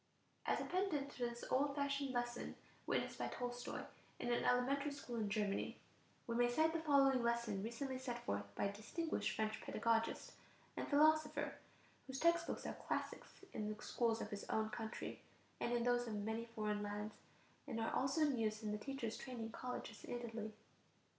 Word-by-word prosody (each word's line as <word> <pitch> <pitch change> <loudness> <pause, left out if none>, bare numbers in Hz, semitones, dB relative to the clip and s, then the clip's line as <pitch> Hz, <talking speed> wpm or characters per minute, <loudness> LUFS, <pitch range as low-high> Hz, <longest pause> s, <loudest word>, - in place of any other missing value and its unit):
As - - +3
a - - -1
pendant 340 -7 +1
to - - -12
this 235 0 -7
old 280 +2 +3
fashioned 280 -1 +1
lesson 240 -1 -1 0.3
witnessed - - 0
by - - 0
Tolstoy 245 0 -3 0.3
in 240 - -1
an 240 - +2
elementary 275 +4 +3
school 265 -4 -5
in 215 -2 +1
Germany, 205 -1 0 0.5
we 235 - -2
may 240 +1 +4
cite 315 +6 +4
the 330 - +1
following 275 -4 +5
lesson 235 -4 +1
recently 255 +4 -2
set 245 -2 -4
forth 100 0 0
by - - 0
a 200 - +1
distinguished 315 +11 -1
French 215 0 0
pedagogist 230 -1 +1 0.4
and - - -2
philosopher, 305 0 +4 0.5
whose 265 0 -3
text 335 0 +5
books - - -3
are - - -1
classics - - -4
in 210 -1 -1
the 215 - -6
schools 230 -2 +2
of - - -4
his 205 -1 -3
own 220 0 +1
country 220 0 -4 0.4
and 235 - 0
in 240 -1 +2
those 245 0 +3
of 220 - -2
many 220 +3 -1
foreign 215 -2 -1
lands, 210 +1 -3 0.5
and 235 -4 -2
are 225 - 0
also 270 +4 +2
in 285 -5 +4
use 215 0 0
in 210 - 0
the 210 - -1
teachers' 255 -2 -3
training 235 -4 -4
colleges 240 -2 -5
in 245 - -3
Italy. 225 -2 -4
240 Hz, 180 wpm, -41 LUFS, 220-275 Hz, 0.5 s, following